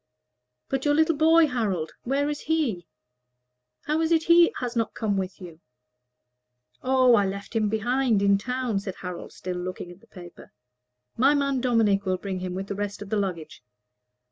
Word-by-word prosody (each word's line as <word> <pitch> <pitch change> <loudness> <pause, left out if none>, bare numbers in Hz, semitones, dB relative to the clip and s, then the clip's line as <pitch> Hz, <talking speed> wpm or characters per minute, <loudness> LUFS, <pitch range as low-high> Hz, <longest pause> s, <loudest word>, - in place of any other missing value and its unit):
"But 270 -1 -2
your 290 -1 +2
little 320 +1 +3
boy, 320 +2 +5
Harold 205 - -2
where 275 +3 0
is 295 0 -3
he? 270 - -1 1.0
How 305 +2 0
is 325 0 0
it 325 -1 +3
he 340 +1 +6
has 245 -1 -4
not 230 -2 -1
come 215 -3 -1
with 190 -1 -4
you?" 170 -3 -11 1.2
"Oh, 255 -1 +4
I 205 -4 +4
left 200 +3 -7
him 215 -2 +1
behind, 230 0 +1
in 200 0 +4
town," 250 -2 -2
said 195 -1 -6
Harold, 180 -1 -7
still 180 -1 -6
looking 180 0 -6
at 175 +2 -15
the - - -22
paper. 175 - -13 0.6
"My 275 +5 +4
man 275 -2 0
Dominic 225 -5 +2
will 185 0 +1
bring 190 0 -5
him, 180 0 -5
with 190 +1 -4
the 200 - -5
rest 205 0 -4
of 200 - -12
the 215 - +1
luggage. 175 -6 -4
215 Hz, 180 wpm, -25 LUFS, 190-270 Hz, 1.2 s, he